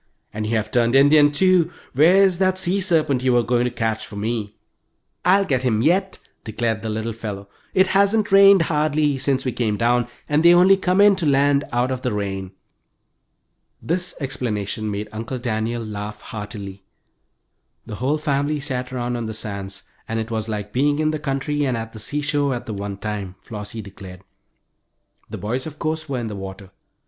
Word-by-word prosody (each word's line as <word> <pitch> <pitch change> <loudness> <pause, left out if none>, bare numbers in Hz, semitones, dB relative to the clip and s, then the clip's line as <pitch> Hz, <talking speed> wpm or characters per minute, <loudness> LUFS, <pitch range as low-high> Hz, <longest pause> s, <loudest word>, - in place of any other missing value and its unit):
"And 110 0 -3
you 115 - 0
have 110 0 -1
turned 120 0 +2
Indian, 145 +2 +6
too! 175 +1 +3 0.2
Where's 180 +6 +5
that 185 -1 +2
sea 190 +1 0
serpent 155 -8 +1
you 130 -1 +2
were 120 -1 +3
going 120 +1 +1
to - - +1
catch 110 -2 -2
for - - -9
me?" 105 0 -3 0.7
"I'll 195 +2 +4
get 130 -7 0
him 115 -4 +1
yet," 190 +5 +1 0.3
declared 110 0 -2
the 110 - -4
little 110 +1 -3
fellow. 105 -3 -6 0.3
"It 190 0 +5
hasn't 200 +2 +2
rained 195 -2 +7
hardly 150 -2 +1
since 135 0 0
we 130 - 0
came 110 -3 -1
down, 120 +1 +2 0.2
and 150 +1 +2
they 170 +1 +7
only 185 +2 +6
come 190 0 +1
in 205 -1 +6
to 170 -4 -1
land 140 0 +3
out 125 +2 0
of 130 -1 -3
the 125 - -1
rain." 95 -2 -3 1.3
This 180 +2 -2
explanation 110 -6 -3
made 105 +1 -4
Uncle 115 +4 -5
Daniel 115 0 -2
laugh 105 0 -6
heartily. 100 -2 -8 1.0
The 105 -2 -7
whole 140 +5 0
family 145 0 -1
sat 130 -3 -4
around 120 -1 -2
on 115 -1 -4
the 110 - -4
sands, 100 -2 -5 0.2
and 110 0 -2
it 110 +1 -4
was 110 -1 -2
like 105 -1 -4
being 145 +3 +2
in 155 0 +1
the 155 - -3
country 145 +1 -2
and 130 -4 0
at 115 0 -6
the 110 - -9
seashore 145 +2 -1
at 120 - -6
the 110 - -5
one 100 0 -5
time, 100 -3 -5
Flossie 105 0 -7
declared. 95 -1 -11 1.1
The - - -6
boys, 120 - -3
of 155 -1 -9
course, 155 -1 -3
were 135 - -2
in 120 -2 -3
the 105 - -5
water. 95 0 -8
125 Hz, 190 wpm, -22 LUFS, 110-150 Hz, 1.3 s, rained